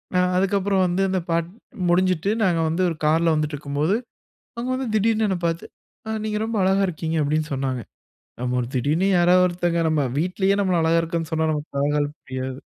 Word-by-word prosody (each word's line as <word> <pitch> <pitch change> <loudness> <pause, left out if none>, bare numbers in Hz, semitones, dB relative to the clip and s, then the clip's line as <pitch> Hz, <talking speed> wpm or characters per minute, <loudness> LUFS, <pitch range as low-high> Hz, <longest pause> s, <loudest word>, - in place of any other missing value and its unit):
ஆ - - +4 0.2
அதுக்கப்புறம் 195 0 +2
வந்து 180 +2 0
அந்த 185 0 0
பாட் 165 0 +1 0.4
முடிஞ்சுட்டு 185 +1 +2
நாங்க 175 -4 +2
வந்து 165 +3 -1
ஒரு 165 - -3
கார்ல 165 +2 +3
வந்துட்ருக்கும்போது, 150 +3 -1 0.6
அவங்க 240 +2 -3
வந்து 260 0 -2
திடீர்னு 220 +1 +2
என்ன 190 - 0
பாத்து, 165 0 -2 0.4
"அ - - -6 0.2
நீங்க 210 -1 -1
ரொம்ப 225 0 -3
அழகா 190 +1 +3
இருக்கீங்க" 165 -1 -3
அப்டின்னு 155 +2 -1
சொன்னாங்க. 130 -2 -2 0.6
நம்ம 125 0 -1
ஒரு 120 - -3
திடீர்னு 150 +9 +1
யாராவது 180 +1 +5
ஒருத்தங்க 175 -1 0
நம்ம 155 -2 +1 0.2
வீட்லேயே 190 +4 +1
நம்மள 185 -3 +1
அழகா 165 +1 +3
இருக்கான்னு 165 -1 -3
சொன்னா 160 0 +1
நமக்கு 150 -1 -5
தலகால் 145 +1 0
புரியாது. 130 0 -5
170 Hz, 175 wpm, -23 LUFS, 150-185 Hz, 0.6 s, யாராவது